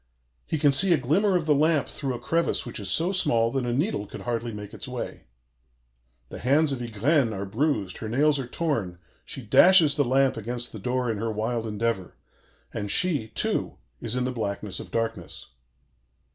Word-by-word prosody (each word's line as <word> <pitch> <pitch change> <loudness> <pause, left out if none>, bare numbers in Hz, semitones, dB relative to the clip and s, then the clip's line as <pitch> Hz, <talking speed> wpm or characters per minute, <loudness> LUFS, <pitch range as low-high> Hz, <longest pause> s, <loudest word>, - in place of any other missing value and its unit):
He 160 - -1
can 145 -1 +4
see 175 +7 +4
a - - +4
glimmer 190 - +2
of 170 -3 +1
the 155 - +4
lamp 150 0 +2
through 135 -4 -4
a - - -6
crevice 170 +1 0
which 120 - -6
is 100 -2 -4
so 165 - +2
small 120 -12 +2
that 130 -2 -1
a - - 0
needle 130 - -1
could - - -9
hardly 120 -1 -3
make 105 -1 -8
its - - -7
way. - - -6 1.0
The - - -8
hands 145 +4 +3
of 135 - -3
Ygraine 120 +2 +1
are 100 0 -4
bruised, 105 - -1
her 110 - -5
nails 145 +4 +2
are 130 - -4
torn, 120 - -2 0.3
she 130 - -6
dashes 165 - +6
the 145 - +2
lamp 135 0 +2
against 120 +2 -4
the 110 - -8
door 125 +2 -1
in 105 - -4
her 115 +1 -2
wild 110 +2 -2
endeavor, 105 -3 -2 0.6
and 105 -2 -4
she, 150 - +1
too, 110 - -2 0.2
is 115 +1 -3
in 125 - 0
the 130 - -1
blackness 100 -5 -4
of - - -9
darkness. 115 -6 -4
120 Hz, 195 wpm, -26 LUFS, 110-150 Hz, 1.0 s, dashes